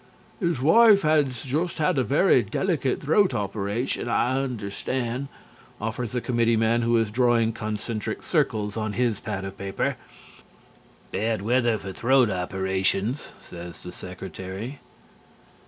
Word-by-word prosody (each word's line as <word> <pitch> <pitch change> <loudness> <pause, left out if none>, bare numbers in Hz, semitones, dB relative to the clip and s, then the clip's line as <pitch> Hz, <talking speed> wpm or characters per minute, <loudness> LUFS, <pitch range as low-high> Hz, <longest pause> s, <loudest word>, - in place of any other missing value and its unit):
"His 170 - 0
wife 205 - +6
has 145 -6 +2
just 155 +6 -1
had 160 -1 +2
a - - +3
very 145 +1 +4
delicate 135 - -1
throat 160 0 +3
operation, 105 +4 -2
I 120 +2 +1
understand," 125 +2 -3 0.5
offers 115 +2 -3
a 125 - 0
committeeman 115 -1 +2
who 115 0 +3
is 115 -2 +1
drawing 120 -1 +3
concentric 110 0 -4
circles 105 -2 0
on 110 -2 -2
his 120 -3 0
pad 100 -3 -4
of 95 0 -8
paper. 95 0 -2 1.1
"Bad 110 -2 -1
weather 120 0 +2
for 95 -1 -7
throat 125 +1 +3
operations," 95 +6 -1
says 85 -1 -10
the 90 - -7
Secretary. 95 - -7
115 Hz, 125 wpm, -25 LUFS, 100-130 Hz, 1.1 s, wife